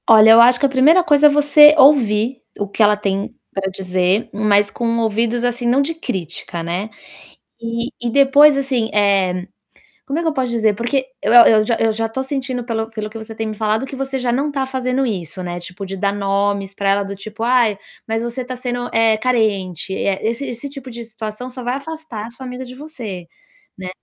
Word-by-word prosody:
Olha, 220 0 +8
eu 225 +1 +8
acho 245 +1 +5
que - - +2
a - - +2
primeira 290 +7 +4
coisa 300 -2 +5
é - - +5
você 295 +1 +6
ouvir 245 -4 +3 0.2
o 205 - -2
que 200 - -4
ela 210 0 +4
tem 200 +2 -3 0.2
para 195 -1 -2
dizer, 185 +1 -1
mas 205 -1 +2
com 230 -1 -2
ouvidos, 230 +2 0
assim, 245 0 -2
não 255 +4 +3
de 300 +4 -2
crítica, 180 - -5
né, 180 +6 -4 0.7
e 230 +2 -4
e 240 0 -2
depois, 280 +3 +5
assim, 260 -5 -1
eh, 195 -3 +1 0.6
como 280 +3 -2
é - - -1
que 330 - 0
eu - - 0
posso 260 -3 -2
dizer, 220 -3 +1
porque 250 +5 -1 0.2
eu 215 - +1
eu 225 -3 +7
já 230 - +1
eu 225 -1 +1
já 225 +1 -2
tô 265 +4 -4
sentindo 265 -2 -4
pelo 225 -2 -3
pelo 215 -1 -5
o - - -18
que 225 - -8
você 220 0 -9
tem 225 0 -4
me 215 - -5
falado 215 +3 -1
que 270 - -8
você 270 0 -3
já 250 -1 -1
não 280 +4 -1
tá 275 -2 -2
fazendo 260 0 -2
isso, 185 -6 -4
né, 175 -1 -5
tipo, 180 +2 -9
de 195 0 -6
dar 200 +1 0
nomes 200 0 -1
pra 200 0 -2
ela 200 +1 +2
do 200 0 -6
tipo: 215 +3 -9
"Ai, 235 -3 +2 0.3
mas 225 0 -1
você 240 +2 -4
tá 255 +1 -6
sendo, 245 -1 -4
eh, 225 -1 +3
carente.", 200 -7 -1
eh, 195 0 -2
esse 235 +5 -2
esse 245 +4 -6
tipo 270 -2 -10
de 235 0 -8
situação 220 +2 -7
só 255 0 -8
vai 245 +1 -1
afastar 280 -6 -7
a - - -10
sua 260 +2 -11
amiga 250 +1 -7
de 250 0 -11
você, 235 - -8 0.5
né. 185 -1 -7
230 Hz, 220 wpm, -18 LUFS, 205-260 Hz, 0.7 s, Olha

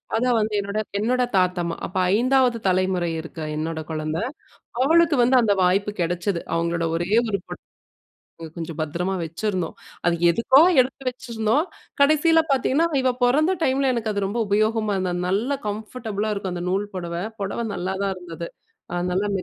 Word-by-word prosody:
அத 235 +3 +1
வந்து, 215 0 -1
என்னோட 200 +2 -3 0.2
என்னோட 250 +3 +1
தாத்தம்மா. 180 -2 +1
அப்போ 185 - -3 0.2
5வது 250 0 +3
தலைமுறை 185 -2 +1
இருக்கா 160 -1 -7
என்னோட 160 0 -3
குழந்தை, 155 +5 -2 0.6
அவளுக்கு 330 0 +4
வந்து, 255 +2 +4
அந்த 205 -3 +3
வாய்ப்பு 195 +3 +2
கிடைச்சது. 175 +1 -1
அவங்களோட 170 0 0
ஒரே 175 +4 -3 0.2
ஒரு 200 -2 0
புடவ. - - -9 1.0
கொஞ்சம் 165 -1 -5
பத்திரமா 175 +5 -2
வச்சுருந்தோம். 180 +1 -3 0.3
அது 170 0 +3
எதுக்கோ, 235 - +4 0.2
எடுத்து 265 +2 +1
வச்சுருந்தோம்! 235 +3 -1 0.4
கடைசில 310 +3 +5
பார்த்தீங்கன்னா, 275 +5 +2
இவ 255 -1 +2
பொறந்த 305 +9 +3
டைம்ல 265 -1 +2
எனக்கு 225 -2 -1
அது 200 -1 -1
ரொம்ப 230 +4 -2
உபயோகமா 215 +1 +1
இருந்தது. 185 -1 -1
அது 180 - -2
நல்ல 235 +9 0
கம்ஃபர்டபுளா 215 0 -3
இருக்கும் 195 -3 -4
அந்த 175 0 -4
நூல் 195 +2 0
புடவ. 170 -2 -4 0.3
புடவ 200 +4 -2
நல்லாதான் 190 +2 -2
இருந்தது. 170 -1 -7 0.6
நல்லா 200 +3 0
200 Hz, 150 wpm, -23 LUFS, 175-245 Hz, 1.0 s, கடைசில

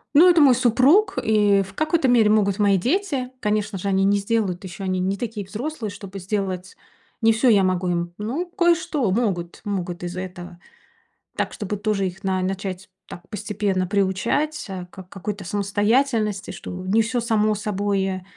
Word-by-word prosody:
Ну, 340 +5 +8
это 340 -2 +5
мой 265 -4 +7
супруг, 255 - +4
и 205 -2 +3
в 195 +1 -12
какой-то 310 - +1
мере 235 -4 +5
могут 205 -2 +2
мои 200 -1 +4
дети. 270 - -1
Конечно 210 -1 -1
же, 195 +2 -4
они 195 0 +2
не 200 +1 +3
сделают 200 -3 -1
ещё, 190 +1 -8
они 185 -1 -1
не 190 +2 -1
такие 220 -3 -4
взрослые, 225 +2 -5
чтобы 195 -1 -9
сделать 190 -1 -3 0.5
не 225 0 +5
всё 235 +3 +3
я 200 -3 +5
могу 185 -1 0
им, 175 0 -2
ну, 245 +12 -3
кое-что 340 - +1
могут 190 -6 -1
могут 180 -4 -3
из 175 0 -5
этого. 180 -1 -7 0.8
Так, - - -1
чтобы 210 0 -4
тоже 205 -2 0
их 185 +1 -7
на 190 -1 0
начать 190 0 -4 0.2
так 175 +1 -11
постепенно 205 -3 -2
приучать, 215 - 0
э, 185 -2 -6
к 190 - -10
какой-то 195 +2 -6
самостоятельности, 205 +3 0
что - - -8 0.2
не 220 +4 +3
всё 240 +2 -1
само 215 -2 +1
собой 195 -2 -1
205 Hz, 170 wpm, -23 LUFS, 190-230 Hz, 0.8 s, Ну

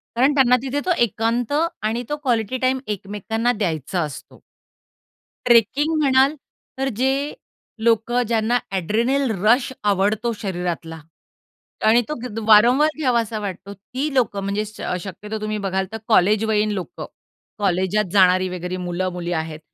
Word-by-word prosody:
कारण 260 +5 +3
त्यांना 250 -2 +5
तिथे 275 +1 -2
तो 370 - +1
एकांत 230 +3 -1 0.3
आणि 225 +3 -1
तो 295 - -2
क्वालिटी 240 -1 0
टाईम 255 +1 +1
एकमेकांना 210 +3 -2
द्यायचा 175 - -2
असतो. 150 -4 -7 1.0
ट्रेकिंग 255 +7 +3
म्हणाल, 270 +1 +4 0.4
तर 270 0 0
जे 275 +3 0 0.5
लोकं 235 +2 +2
ज्यांना 230 +1 +1 0.2
एड्रेनल 235 +8 0
रश 245 +4 +4 0.2
आवडतो 205 +4 0
शरीरातला 175 -4 -4 0.9
आणि 235 +2 +5
तो 305 - -2
घेत 225 -2 -5
वारंवार 245 +8 +6
घ्यावासा 235 -6 0
वाटतो, 200 0 -6
ती 260 +9 -5
लोकं 235 -6 +1
म्हणजे 200 +2 -1
स 215 0 -11 0.2
शक्यतो 210 +4 -6
तुम्ही 215 0 -2
बघाल 190 0 0
तर 225 - -4
कॉलेजवयीन 215 0 +3
लोकं, 190 -4 -5 0.5
कॉलेजात 190 +2 +1
जाणारी 185 -1 +4
वगैरे 180 0 -4
मुलं, 180 +1 -2
मुली 175 -1 -4
आहेत 160 -1 -4
215 Hz, 135 wpm, -21 LUFS, 190-245 Hz, 1.0 s, वारंवार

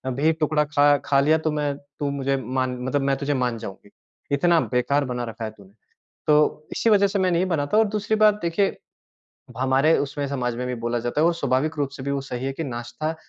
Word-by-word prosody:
भी 155 +4 +3
टुकड़ा 155 -1 +1
ख़ा 145 -1 +4
ख़ा 140 -1 +3
लिया 155 +3 +4
तो 155 -1 -1
मैं 145 -1 -1 0.2
तू 145 -1 -1
मुझे 135 -1 -1
मतलब 130 +2 -1
मैं 135 0 +1
तुझे 145 0 -1
मान 125 -3 -1
जाऊँगी। 100 -1 -9 0.5
इतना 170 +3 +3
बेकार 140 +3 +1
बना 125 -1 -3
रखा 115 0 -7
है 110 - -5
तूने। 100 -3 -18 0.6
तो 150 0 +2
इसी 230 - +1
वज़ह 200 -1 +5
से 200 0 -1
मैं 185 -1 +2
नहीं 175 +2 +1
बनाता 160 +3 0
और 220 - +6
दूसरी 210 +1 -1
बात 215 -1 +5
देखिए। 170 +4 0 0.8
हमारे 135 +4 +3
उसमें 140 0 -2
समाज 125 -4 -2
में 125 +1 -3
भी 125 - -2
बोला 120 0 0
जाता 120 +6 -1
है - - +4
और 170 - +2
स्वाभाविक 155 0 -1
रूप 140 -2 0
से 130 - -7
भी 140 - -2
वो 140 -1 -1
सही 130 -1 -5
है 135 - -1
कि 160 - -4
नाश्ता 125 +5 -4
140 Hz, 220 wpm, -23 LUFS, 130-160 Hz, 0.8 s, और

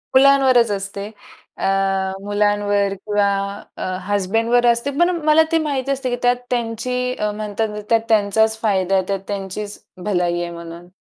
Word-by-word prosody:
मुलांवरच 260 -4 +5
असते. 200 0 -4 0.5
अ, - - -3 0.6
मुलांवर 205 -1 +1
किंवा 205 +1 0 0.5
अ, - - -7 0.3
हजबंडवर 225 +5 +1
असते 235 +4 +2
पण 345 +1 +5 0.2
मला 310 +1 +6
ते 330 - +4
माहीत 275 -2 -2
असते 270 -2 -1
की 245 - 0
त्यात 245 0 +4
त्यांची 250 +1 -2
अ, 210 0 -1
म्हणतात 215 +1 -2
ना 210 0 -6
त्यात 230 -1 +4
त्यांचाच 220 +1 +3
फायदा 195 -3 +1
आहे, 190 - +2
त्यात 195 -1 -1
त्यांचीच 200 +1 -5 0.2
भलाई 175 -3 0
आहे 175 - -3
म्हणून. 170 0 -9
210 Hz, 155 wpm, -20 LUFS, 200-245 Hz, 0.6 s, मला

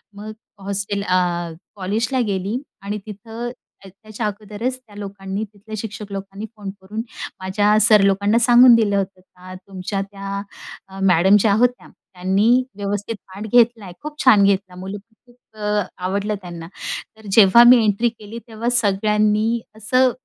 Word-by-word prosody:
मग 210 +2 -8 0.3
हॉस्टेल 200 +1 -3
अ, 185 -2 +2 0.6
कॉलेजला 215 +6 -1
गेली, 200 +5 -2 0.2
आणि 200 +2 -4
तिथं 225 +3 -7 0.3
त्या 195 - -11
त्याच्या 215 +3 -7
अगोदरच 215 +4 -4
त्या 225 -5 -20
लोकांनी 195 0 -5
तिथल्या 215 +1 -10
शिक्षक 210 -1 -7
लोकांनी 195 +1 -6
फोन 205 -2 -6
करून 210 +4 -5 0.4
माझ्या 205 +3 +2
सर 215 -2 +6
लोकांना 200 +3 +2
सांगून 240 +1 +7
दिलं 215 -3 +2
होतं 190 -1 -3
का, 185 0 -14
"तुमच्या 190 +1 -5
त्या 195 0 -6 0.5
अ, 195 0 -11
मॅडम 190 +1 +5
ज्या 205 0 +3
होत्या 245 +1 +1
त्यांनी 200 +7 +1
व्यवस्थित 205 +2 -3
पाठ 195 +3 -8
घेतला 235 -2 +4
आहे. 180 - -9
खूप 300 0 -8
छान 215 -6 +7
घेतला 195 -2 +1
मुलं 190 +3 -6
तर 220 +3 -30
खूप 240 -1 -22 0.2
क 210 -1 0 0.2
आवडलं 200 +3 -1
त्यांना. 170 -2 -8 0.5
तर 220 -1 -14
जेव्हा 215 +3 +7
मी 245 -2 +7
एंट्री 215 +3 +2
केली 225 0 -10
तेव्हा 230 +1 -3
सगळ्यांनी 215 0 +2 0.2
असं, 255 +4 +2
205 Hz, 155 wpm, -20 LUFS, 195-225 Hz, 0.6 s, सांगून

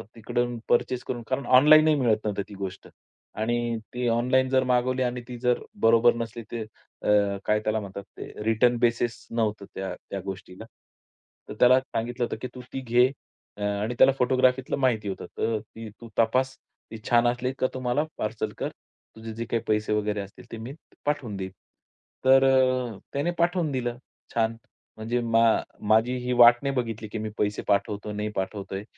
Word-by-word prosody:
तिकडून 120 +2 -2
पर्चेस 125 +1 +1
करून" 120 - -4
कारण 135 +1 -2
ऑनलाईनही 155 +4 +7
मिळत 120 -6 +2
नव्हतं 105 -2 -1
ती - - -10
गोष्ट. 95 -1 -6 0.5
आणि 120 +1 -1 0.2
ती 125 0 -1
ऑनलाईन 125 +3 +2
जर 130 0 +3
मागवली 125 0 +1
आणि 125 0 -2
ती 125 - -7
जर 125 -1 +2 0.2
बरोबर 115 +1 +5
नसली 115 0 -5
तर 115 -1 -3 0.4
अ, 100 -1 +3
काय 105 0 +2
त्याला 110 0 -1
म्हणतात 100 -1 -7
ते - - -6 0.2
रिटर्न 115 +3 +3
बेसिस 120 -1 0
नव्हतं 110 -3 -1
त्या 95 0 -4 0.2
त्या 100 - -3
गोष्टीला. 95 +1 -7 0.8
तर - - -5
त्याला 125 +1 +7
सांगितलं 120 -1 -3
होतं, - - -4
की 125 - -3
"तू 125 - -7
ती 135 - -3
घे" 125 0 +4 0.5
अ, - - -10
आणि 105 +3 -1
त्याला - - +8
फोटोग्राफीलं 130 +1 +2
माहिती 115 -6 +1
होतं. 95 - -5
"तर 115 -1 0
ती 110 +1 -10
तू 115 - -10
तपास, 130 +4 +2 0.4
ती 115 - -6
छान 120 0 +5
असली 125 +1 0
का 130 - +3
तुम्हाला 130 +3 0
पार्सल 110 +1 -3
कर, - - -2 0.5
तुझे 110 0 -8
जे 115 +1 -4
काही 115 0 -2
पैसे 105 0 +1
वगैरे 105 -1 0
असतील 100 0 -11
ते - - -5
मी 115 +5 -7 0.3
पाठवून 145 -8 -1
देईन." 95 -1 -5 0.7
तर 135 0 +7
अ, 130 -4 +2 0.2
त्याने 145 +5 0
पाठवून 170 -2 +1
दिलं 120 -2 -2 0.4
छान. 115 0 +1 0.4
म्हणजे 115 +3 -1
मा 115 -1 +2 0.5
माझी 110 +3 +4
ही 125 - 0
वाट 120 0 +8
नाही 140 -1 -1
बघितली, 115 -3 -3
की 110 - -5
मी 110 0 -3
पैसे 105 0 0
पाठवतोय 105 +1 0
नाही 105 +1 -2
पाठवतोय. 95 0 -4
120 Hz, 175 wpm, -26 LUFS, 110-125 Hz, 0.8 s, त्याला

